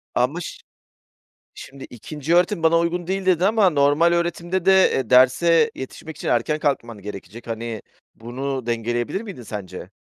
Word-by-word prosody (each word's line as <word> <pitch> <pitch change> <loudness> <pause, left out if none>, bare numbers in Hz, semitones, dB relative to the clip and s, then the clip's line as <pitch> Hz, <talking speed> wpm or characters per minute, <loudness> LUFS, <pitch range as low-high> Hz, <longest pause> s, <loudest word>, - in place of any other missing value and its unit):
Ama 135 +8 0
ş - - -7 1.0
şimdi, 135 0 -11
"İkinci 150 +7 -3
öğretim 175 0 +2
bana 165 +1 +4
uygun 170 +1 -2
değil." 190 0 -2
dedin 180 -2 +2
ama 210 -2 +4
normal 145 +2 +3
öğretimde 175 +1 -2
de, 190 0 +5
eee, 130 -4 -2
derse 165 - +4
yetişmek 150 +3 -9
için - - -6
erken 125 +6 0
kalkman 120 -7 -2
gerekecek. 105 +3 -9
Hani, 115 -1 -5 0.3
bunu 130 +2 -5
dengeleyebilir 120 - -2
miydin 200 - -9
sence? 105 -4 -8
145 Hz, 150 wpm, -22 LUFS, 120-175 Hz, 1.0 s, de